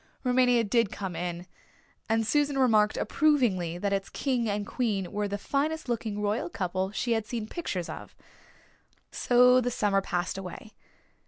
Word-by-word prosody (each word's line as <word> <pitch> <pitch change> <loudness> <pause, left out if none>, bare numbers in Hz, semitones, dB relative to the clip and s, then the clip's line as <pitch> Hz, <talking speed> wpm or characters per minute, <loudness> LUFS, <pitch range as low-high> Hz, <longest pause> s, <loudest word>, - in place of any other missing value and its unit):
Rumania 250 -2 +3
did 230 -1 +2
come 190 -5 -5
in 175 +1 -4 0.6
and 225 0 +2
Susan 290 +3 +1
remarked 220 -5 +3
approvingly 230 - +1
that 200 +2 -1
its 195 0 -2
king 245 -5 -1
and 205 0 -2
queen 205 -7 -2
were 210 -1 -1
the 200 0 -3
finest 295 +8 -2
looking 225 -3 -2
royal 210 -3 -1
couple 185 +1 -2
she 235 +4 -2
had 220 -2 0
seen 225 -1 -3
pictures 195 - -4
of. - - -9 1.0
So 250 +1 +5
the 245 - 0
summer 205 -4 +1
passed 180 0 -2
away. 195 +3 -9
215 Hz, 155 wpm, -28 LUFS, 195-245 Hz, 1.0 s, So